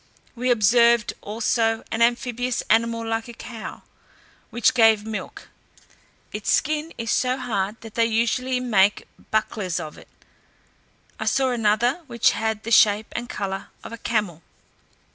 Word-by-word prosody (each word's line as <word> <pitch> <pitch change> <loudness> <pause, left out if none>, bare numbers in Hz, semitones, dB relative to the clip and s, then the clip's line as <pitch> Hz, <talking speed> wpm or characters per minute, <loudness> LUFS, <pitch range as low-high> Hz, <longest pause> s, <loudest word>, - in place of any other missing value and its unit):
We 250 +1 -1
observed 235 0 +4
also 225 +1 0
an 225 - -2
amphibious 245 +1 0
animal 230 +1 +2
like 225 0 -2
a 235 - -9
cow, 230 -2 -9 0.7
which 240 -1 +2
gave 225 -3 +4
milk; 220 -1 -7 0.8
its 210 0 -2
skin 310 +3 0
is 230 -1 -3
so 255 0 +1
hard, 215 -4 -2
that 225 -2 -11
they 230 -1 +2
usually 245 +3 0
make 205 -5 +2 0.2
bucklers 210 -4 -1
of 155 - -8
it. - - -16 1.1
I - - -3
saw 265 -1 +2
another, 240 +6 +1
which 235 -3 +2
had 220 -1 -2
the 230 - -5
shape 210 -1 +4
and 240 +1 -4
colour 195 -1 -4 0.2
of - - -9
a - - -6
camel. 205 -9 -2
230 Hz, 145 wpm, -23 LUFS, 215-240 Hz, 1.1 s, observed